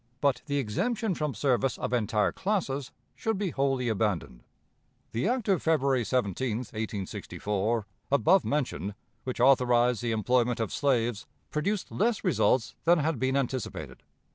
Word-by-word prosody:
But 140 -3 +2
the 145 -1 0
exemption 200 - 0
from 150 -4 -2
service 130 -2 +1
of - - -3
entire 105 -3 +2
classes 145 -10 -2 0.2
should 225 -2 -1
be 195 -3 -1
wholly 135 -3 0
abandoned. 100 - -1 0.7
The 120 - 0
act 245 -2 0
of 195 -3 +2
February 140 -6 +2
17, 115 0 0
1864 105 -1 -3 0.3
(above 170 +7 +4
mentioned), 105 - -2 0.3
which 130 -2 -4
authorized 125 -2 +4
the 120 -1 -1
employment 120 +2 +1
of 110 -3 -2
slaves, 120 -6 0 0.2
produced 195 +6 -1
less 225 +2 0
results 120 - +2
than 170 +1 +6
had 155 -3 0
been 130 +1 +1
anticipated. 115 - -3
130 Hz, 140 wpm, -28 LUFS, 110-150 Hz, 0.7 s, than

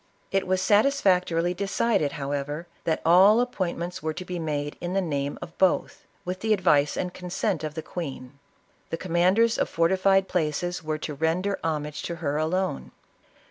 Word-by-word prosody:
It 195 -1 0
was 185 0 +1
satisfactorily 185 -7 +3
decided, 195 -4 0
however, 145 +3 -3
" - - -35
that 160 -1 0
all 190 +7 +7
ap 245 0 0
pointments 175 -4 -3
were 155 0 -3
to 185 - -6
be 180 -1 -4
made 145 -2 -3
in 175 +1 -3
the 195 - +2
name 145 -6 -2
of 170 - -10
both, 190 -2 +1 0.2
with 180 +1 -3
the 220 +1 +2
advice 150 -7 +2
and 180 -1 -2
consent 180 0 -2
of 155 -1 -4
the 160 - -4
queen. 140 -5 -7 0.5
The 165 - -3
command 180 +2 +2
ers 230 0 +3
of - - +1
fortified 190 +3 +3
places 175 +1 -1
were 155 0 -2
to 155 0 -5
render 165 +7 0
homage 150 -2 -2
to 170 - -3
her 150 -3 -2
alone. 160 - -1
175 Hz, 180 wpm, -26 LUFS, 155-190 Hz, 0.5 s, all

